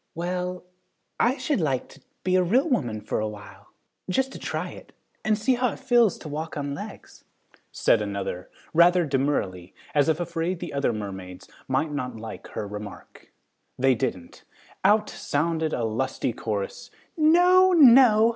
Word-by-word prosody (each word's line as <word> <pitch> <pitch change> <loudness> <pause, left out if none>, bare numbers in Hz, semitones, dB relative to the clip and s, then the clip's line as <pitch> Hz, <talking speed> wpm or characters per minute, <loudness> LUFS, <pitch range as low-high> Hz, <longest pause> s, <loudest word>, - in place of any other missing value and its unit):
"Well, 180 +1 -3 0.6
I 250 +4 +2
should 285 - -1
like 135 -5 -1
to 140 - -17 0.2
be 185 +1 +1
a 185 - +5
real 235 - +2
woman 120 - -1
for 105 - -2
a 110 - -1
while, 105 -1 -11 0.4
just 265 +8 0
to - - -9
try - - -4
it, - - -13 0.3
and 215 -1 +2
see 225 +5 +2
how 250 0 0
it - - -11
feels 240 -6 +3
to - - -10
walk 155 +2 -5
on 140 -1 -3
legs," - - -10 0.5
said 115 - +2
another, 100 -3 -4 0.2
rather 175 +1 +5
demurely, 130 - -2 0.2
as 145 0 +3
if 160 +1 +1
afraid 170 +1 -2
the - - -6
other 140 -3 +1
mermaids 95 -4 -7 0.2
might 150 +4 0
not 125 -4 -4
like 110 0 -8
her 105 - -5
remark. 105 0 -10 0.5
They 130 +1 +4
didn't. 90 -6 -4 0.4
Out 210 +2 +4
sounded 160 +1 -1
a 120 - -2
lusty 115 +2 -2
chorus, 105 -4 -4 0.3
"No! 355 +4 +5
No! 245 -7 +7
155 Hz, 160 wpm, -25 LUFS, -, 0.6 s, No